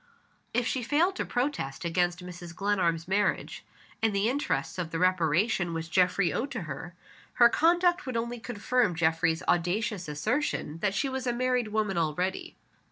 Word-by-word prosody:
If 240 +1 0
she 255 - -1
failed 315 +10 +2
to - - -1
protest 215 - -2
against 175 +1 0
Mrs. 175 -1 -9
Glenarm's 175 -5 0
marriage, 200 +1 0 0.4
in 220 -1 +2
the 200 +3 +2
interests 215 - -2
of 170 -3 -2
the 165 - -3
reparation 175 0 +2
which 165 0 -5
Geoffrey 180 0 +3
owed 270 - -2
to 230 - -3
her, 160 +4 -7 0.4
her 240 -1 +6
conduct 345 +3 +3
would 255 -3 -2
only 235 +1 -3
confirm 225 -1 0
Geoffrey's 160 0 +1
audacious 180 +2 0
assertion 165 - -2
that 200 +2 0
she 275 - +1
was 265 -1 -3
a 245 - +1
married 250 -1 +1
woman 210 -4 0
already. 175 +4 -2
195 Hz, 165 wpm, -28 LUFS, 170-240 Hz, 0.4 s, her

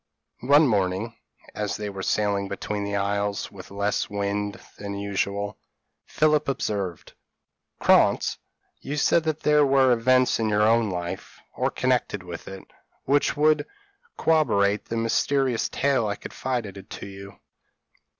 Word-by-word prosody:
One 145 +3 +7
morning, 100 +1 0 0.4
as 105 -1 -2
they 105 - -4
were 100 -1 -6
sailing 100 0 0
between 100 +1 -4
the 100 0 -3
isles, 100 0 -1
with 95 -2 -11
less 100 +1 -1
wind 100 0 -2 0.2
than 100 -1 -5
usual, 100 0 -2 0.5
Philip 150 -1 +2
observed: 100 - -3 0.7
"Krantz, - - +3 0.4
you 145 +2 -5
said 165 +2 +3
that 155 -1 -1
there 150 0 +4
were 135 -2 +4
events 125 +2 +3
in 110 -1 +1
your 105 0 +2
own 115 0 +3
life, 90 -1 -5 0.2
or - - 0
connected 125 -6 0
with 85 -2 -8
it, 95 0 -8 0.4
which 145 +1 +2
would 150 0 +3 0.5
corroborate 105 -11 +2
the 115 - -4
mysterious 125 +2 +1
tale 135 -6 +1
I 100 - -1
confided 110 -6 -5
to - - -7
you. 100 0 -11
105 Hz, 135 wpm, -25 LUFS, 100-130 Hz, 0.7 s, One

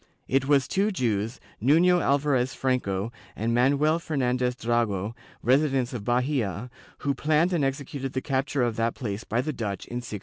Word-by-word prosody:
It 135 0 +1
was 140 -2 +4
two 200 +2 +1
Jews, 115 - -1 0.2
Nuiio 170 +8 +5
Alvarez 135 -3 +1
Franco 115 -6 -1 0.2
and 115 +2 -1
Manuel 145 +6 +3
Fernandez 125 -5 0
Drago, 115 -4 0 0.3
residents 135 -1 +2
of 115 -4 -4
Bahia, 125 -2 -1 0.3
who 140 - +2
planned 155 +6 +2
and 165 -5 +1
executed 135 0 -3
the 130 - 0
capture 135 -1 0
of 120 -2 -1
that 115 0 0
place 110 -4 -4
by 120 - 0
the 155 +3 -3
Dutch 105 -6 -4
in 120 - -5
1625. 120 -4 -5
130 Hz, 165 wpm, -26 LUFS, 115-140 Hz, 0.3 s, Nuiio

